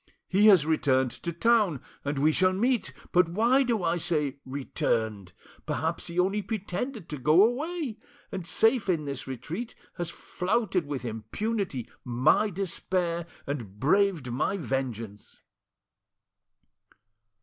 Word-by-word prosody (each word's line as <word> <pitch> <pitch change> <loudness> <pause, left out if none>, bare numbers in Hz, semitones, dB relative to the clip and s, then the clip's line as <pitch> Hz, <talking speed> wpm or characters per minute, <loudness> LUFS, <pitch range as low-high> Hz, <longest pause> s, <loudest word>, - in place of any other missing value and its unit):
He 200 +3 +4
has 185 -8 +7
returned 130 -5 +2
to 170 - -5
town, 205 - +3 0.2
and 140 0 -2
we 150 +3 +4
shall 185 +3 +3
meet! 240 +5 +1 0.2
But 180 -1 +4
why 235 +9 +3
do 235 -7 0
I 170 +1 +1
say 150 -5 0
'returned'? 110 -7 -2 0.4
Perhaps 165 +3 -2
he 170 0 -7
only 195 +3 +2
pretended 210 +1 -4
to 150 - -5
go 155 +8 +6
away, 275 0 -1 0.3
and 180 -3 -5
safe 225 +3 +3
in 160 -5 +1
this 140 -1 -4
retreat 155 - -5 0.2
has 175 -2 -2
flouted 185 -1 -1
with 135 -3 -4
impunity, 130 - -3 0.2
my 130 - +3
despair 180 -2 -2 0.2
and 115 -9 -5
braved 165 -3 +2
my 145 +10 0
vengeance!" 120 - -4
170 Hz, 125 wpm, -28 LUFS, 135-205 Hz, 0.4 s, has